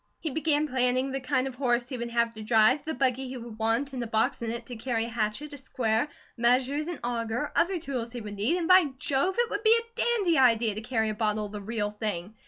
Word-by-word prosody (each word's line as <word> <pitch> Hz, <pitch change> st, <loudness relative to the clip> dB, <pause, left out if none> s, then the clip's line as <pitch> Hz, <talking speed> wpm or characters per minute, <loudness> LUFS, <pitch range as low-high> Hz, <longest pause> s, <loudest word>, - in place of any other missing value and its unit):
He 320 Hz, -, -3 dB
began 305 Hz, 0 st, +1 dB
planning 255 Hz, 0 st, +1 dB
the 270 Hz, -, -2 dB
kind 255 Hz, 0 st, 0 dB
of 265 Hz, -, -6 dB
horse 245 Hz, -2 st, 0 dB
he 265 Hz, -, -4 dB
would 235 Hz, -1 st, -4 dB
have 235 Hz, 0 st, +1 dB
to 220 Hz, -, -9 dB
drive, 220 Hz, +5 st, +4 dB
the 315 Hz, -, -4 dB
buggy 260 Hz, 0 st, 0 dB
he 255 Hz, 0 st, -6 dB
would 230 Hz, -2 st, -9 dB
want, 230 Hz, +5 st, 0 dB
and 255 Hz, -, -3 dB
a -, -, -5 dB
box 220 Hz, +1 st, 0 dB
in 230 Hz, -, -2 dB
it 235 Hz, +1 st, -4 dB
to 245 Hz, -, -8 dB
carry 225 Hz, 0 st, -1 dB
a -, -, -6 dB
hatchet, 230 Hz, +6 st, -3 dB
a 285 Hz, -, -8 dB
square, 235 Hz, -1 st, 0 dB, 0.3 s
measures, 255 Hz, +5 st, +2 dB
an 350 Hz, -3 st, -4 dB
auger, 235 Hz, +3 st, -2 dB
other 365 Hz, +2 st, +2 dB
tools 255 Hz, -7 st, -4 dB
he 245 Hz, -, -4 dB
would 210 Hz, -2 st, -7 dB
need, 240 Hz, -, +1 dB
and 340 Hz, -2 st, -2 dB
by 370 Hz, -1 st, +7 dB
Jove! 285 Hz, +8 st, 0 dB
it 480 Hz, -1 st, +1 dB
would 410 Hz, -, -2 dB
be 445 Hz, +1 st, +6 dB
a 465 Hz, 0 st, -13 dB
dandy 400 Hz, -, +2 dB
idea 230 Hz, -4 st, +4 dB
to 215 Hz, -, -5 dB
carry 225 Hz, -2 st, 0 dB
a -, -, -1 dB
bottle 215 Hz, 0 st, 0 dB
of 205 Hz, -, -8 dB
the 210 Hz, -1 st, -6 dB
real 210 Hz, 0 st, -2 dB
thing. 210 Hz, -2 st, -3 dB
245 Hz, 255 wpm, -28 LUFS, 225-285 Hz, 0.3 s, by